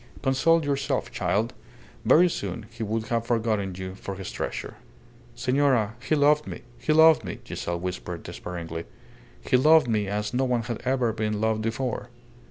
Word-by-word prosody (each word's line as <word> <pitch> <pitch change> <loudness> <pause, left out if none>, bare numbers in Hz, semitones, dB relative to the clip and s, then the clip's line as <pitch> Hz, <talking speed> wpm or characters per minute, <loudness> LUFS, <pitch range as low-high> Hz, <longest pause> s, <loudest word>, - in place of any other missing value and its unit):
"Console 155 +5 +3
yourself, 140 -1 -1
child. 110 +5 0 0.5
Very 175 +3 +6
soon 105 - -4
he 115 0 -11
would 110 +1 -1
have 115 -1 -1
forgotten 110 -5 0
you 95 0 -6
for 100 0 -6
his 95 -1 -6
treasure." - - -5 0.6
"Senora, 125 -3 +2
he 155 - +1
loved 150 +1 +3
me. - - -7 0.2
He - - 0
loved 160 +1 +6
me," - - -5
Giselle 85 0 -4
whispered, 90 -1 -5
despairingly. 85 -2 -6 0.6
"He 130 - +5
loved 155 +2 +6
me 105 -3 0
as 105 +2 -2
no 130 +2 +2
one 125 -2 0
had 120 -1 -5
ever 125 -3 +1
been 105 -1 -1
loved 110 0 +1
before." 120 +2 -2
115 Hz, 165 wpm, -26 LUFS, 105-135 Hz, 0.6 s, Very